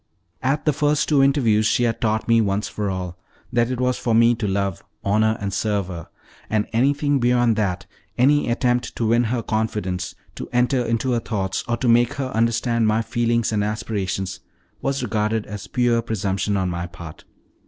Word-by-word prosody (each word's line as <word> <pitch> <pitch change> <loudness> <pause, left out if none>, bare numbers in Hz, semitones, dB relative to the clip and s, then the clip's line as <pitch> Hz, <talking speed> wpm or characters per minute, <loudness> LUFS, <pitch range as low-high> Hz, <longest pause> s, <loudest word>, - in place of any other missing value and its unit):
At 135 +3 0
the 150 - +4
two 140 - -9
first 150 +1 +2
interviews 135 -7 +3
she 120 +2 +2
had 115 -1 0
taught 110 -1 0
me, 115 -1 +4
once 100 0 0
for 105 -2 -3
all, 90 -2 -5 0.3
that 120 0 +2
it 130 -1 -3
was 125 0 0
for 115 -2 +1
me 115 +1 +5
to 115 -3 -3
love, 100 -2 -1 0.2
honor, 110 +2 +2
and 100 -2 -3
serve 100 -2 -1
her, 85 -3 -7 0.4
and 110 -1 +1
that - - -27
anything 145 +3 +2
beyond 120 -2 +3
that 100 -5 -1 0.3
any 145 +2 +3
attempt 120 0 0
to 115 - -1
win 120 +2 +3
her 115 +1 -1
confidence, 105 -5 -2 0.2
to - - -7
enter 125 +1 +2
into 115 +2 0
her 120 - +2
thoughts, 95 -5 -2
or 120 0 0
make 120 +3 +4
her 135 -2 -3
understand 115 0 +1
my 110 +1 +2
feelings 115 -1 0
and 105 -2 +1
aspirations 100 -3 -3 0.4
was 135 -1 -1
regarded 110 -1 -1
as 105 -2 -7
pure 120 -2 +1
presumption 100 -3 -1
on 95 -1 0
my 85 0 -3
part. 85 -3 -11
115 Hz, 185 wpm, -22 LUFS, 105-120 Hz, 0.4 s, me